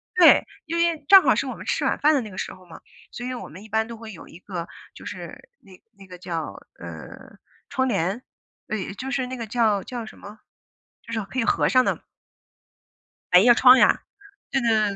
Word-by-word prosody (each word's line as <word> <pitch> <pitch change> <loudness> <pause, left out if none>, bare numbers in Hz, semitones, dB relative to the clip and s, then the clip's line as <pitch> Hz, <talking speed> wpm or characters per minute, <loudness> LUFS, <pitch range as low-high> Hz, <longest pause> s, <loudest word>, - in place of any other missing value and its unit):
对， - - +7 0.2
因 330 +1 -4
为 335 -3 0
正 390 -1 +9
好 - - +4
是 - - -1
我 - - -5
们 - - -11
吃 - - -1
晚 - - +1
饭 305 +2 +3
的 290 - +2
那 220 - -8
个 190 - -12
时 - - -4
候 185 - -17
嘛， 170 - -13 0.3
所 245 - -7
以 255 - -4
我 245 - -7
们 185 +7 -12
一 220 - -14
般 220 +1 0
都 235 - -8
会 225 -1 -10
有 180 - -12
一 - - -13
个， 180 -3 -6 0.3
就 - - -13
是 480 - -9
那 185 -2 -18
那 195 -2 -16
个 180 -1 -11
叫， 165 - -6 0.2
呃， 85 -2 -11 0.3
窗 260 -2 0
帘， 195 0 -1 0.5
哎， 205 -3 -4
就 265 - -5
是 260 -2 -1
那 255 0 -6
个 230 -2 -6
叫 215 -3 +1
叫 240 +2 -7
什 - - -13
么？ 205 +2 -12 0.6
就 230 - -12
是 225 - -1
可 260 - -5
以 - - +2
合 - - +2
上 255 0 +4
的。 - - -2 1.3
百 180 - +9
叶 240 +4 +6
窗 255 +2 +7
呀？ - - +4 0.5
对 270 - +1
对 240 - 0
对 215 -2 +2
220 Hz, 240 characters per minute, -23 LUFS, 190-255 Hz, 1.3 s, 正